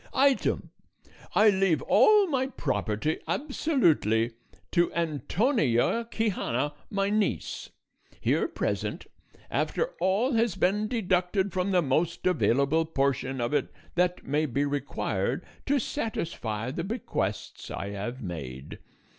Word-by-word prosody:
"Item 275 0 +2 0.6
I 215 0 +7
leave 190 -4 +2
all 425 -1 +6
my 265 -6 0
property 140 - -1
absolutely 170 - +2 0.4
to 175 -1 +3
Antonia 170 - +1
Quixana 165 - -1 0.2
my 195 0 0
niece, 210 -1 -1 0.5
here - - +1
present, - - -3 0.5
after 485 +1 0
all 210 +8 +2
has 230 -4 +2
been 210 +3 +1
deducted 190 -3 0
from 185 +1 0
the 180 -3 +3
most 155 +5 0
available 155 -3 +3
portion 135 -3 0
of 120 +4 -1
it - - 0 0.2
that 180 0 +1
may 150 +3 +1
be 140 +2 0
required 140 -1 -2 0.2
to 285 +1 +3
satisfy 145 - -3
the 165 +4 -3
bequests 135 - -3
I 100 - -4
have 120 +6 -5
made. 70 -7 -7
175 Hz, 115 wpm, -28 LUFS, 130-215 Hz, 0.6 s, I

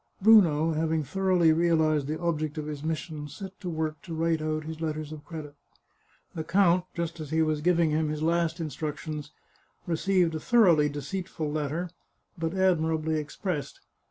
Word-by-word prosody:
Bruno, 170 -7 +6
having 160 0 0
thoroughly 180 +1 +3
realized 160 -3 +2
the 155 +1 -3
object 155 -3 -1
of 155 - -3
his 150 -2 -5
mission, 155 -1 -4
set 190 +6 -9
to 180 - -4
work 155 -2 -3
to 165 - -7
write 165 0 +1
out 155 0 -2
his 160 +1 -7
letters 155 -1 -3
of 155 -1 -8
credit. 155 -3 -8 0.8
The 160 - -4
count, 180 0 +3
just 170 -1 -3
as 155 -2 -6
he 160 +1 +2
was 155 -1 0
giving 170 -1 +3
him 155 0 +1
his 155 0 -3
last 170 +1 +1
instructions, 150 -1 -5 0.5
re 175 - -1
ceived 180 0 +2
a 160 - -2
thoroughly 170 -8 +4
deceitful 150 +1 -4
letter, 155 +3 -2 0.4
but 165 +2 -3
admirably 160 -4 +1
expressed. 150 +1 -4
160 Hz, 165 wpm, -28 LUFS, 155-170 Hz, 0.8 s, Bruno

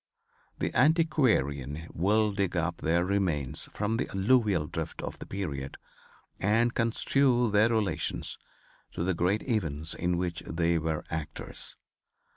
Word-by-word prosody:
The - - -2
antiquarian 110 - +2
will 105 +5 +2
dig 100 -3 -1
up 85 +1 0
their 85 +3 +1
remains 85 -7 0
from 105 +2 -1
the - - -2
alluvial 100 -4 +2
drift - - -5
of - - -6
the - - -8
period, 70 -9 -4 0.6
and 115 +4 +2
construe 120 +1 +2
their 105 +2 +4
relations 110 -3 0 0.5
to - - -2
the 95 +1 +1
great 90 +5 +1
events 80 - -1
in 90 0 -1
which 85 -2 -2
they 85 0 +1
were 80 -1 -2
actors. 80 -1 -5
95 Hz, 130 wpm, -29 LUFS, 80-110 Hz, 0.6 s, their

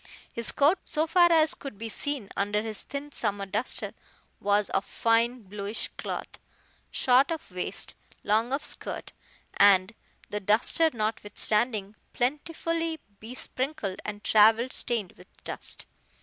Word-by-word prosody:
His 235 - -3
coat, 310 +6 +4
so 310 +1 +1
far 345 +1 +5
as 320 -1 +5
could 275 -7 -9
be 225 +2 -5
seen 255 -1 -3
under 205 +1 0
his 220 -2 -3
thin 285 +1 -6
summer 205 -6 -1
duster 210 +5 -2 0.5
was 205 0 +2
of 195 - +1
fine 230 +2 +1
bluish 205 +2 -3
cloth, - - -6 0.5
short 255 +2 +4
of 325 - -5
waist, 180 0 -3 0.3
long 220 +4 +2
of 275 +2 -1
skirt, - - -6 0.4
and 200 +1 +6 0.3
the 210 - -3
duster 220 - +4
notwithstanding 215 -1 0 0.2
plentifully 325 +4 -1 0.2
besprinkled 250 -1 -4
and 205 0 -6
travel 225 +3 +5
stained 220 -7 -1
with 180 - -15 0.2
dust. - - -4
230 Hz, 130 wpm, -28 LUFS, 205-280 Hz, 0.5 s, and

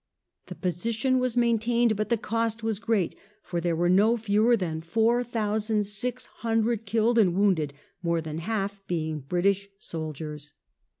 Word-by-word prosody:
The - - -7
position 225 - 0
was 250 -1 -1
main 235 -2 +3
tained, 235 0 +2
but 215 +1 -2
the 235 - +3
cost 230 +1 -2
was 220 -3 -1
great, 220 -6 0 0.3
for 170 -1 -3
there 170 -1 0
were 175 +2 +1
no 205 +6 +4
fewer 220 +2 +3
than 160 -5 -3
four 225 +8 +2
thousand 215 -2 0
six 240 +5 -3 0.2
hundred 225 -1 0
killed 230 +2 +3
and 180 -5 +4
wounded, 185 -7 +2 0.3
more 170 -1 +1
than 160 0 -5
half 200 +1 -2
being 160 -3 -2
British 190 +7 0
soldiers. 155 -4 -7
210 Hz, 160 wpm, -27 LUFS, 175-230 Hz, 0.3 s, no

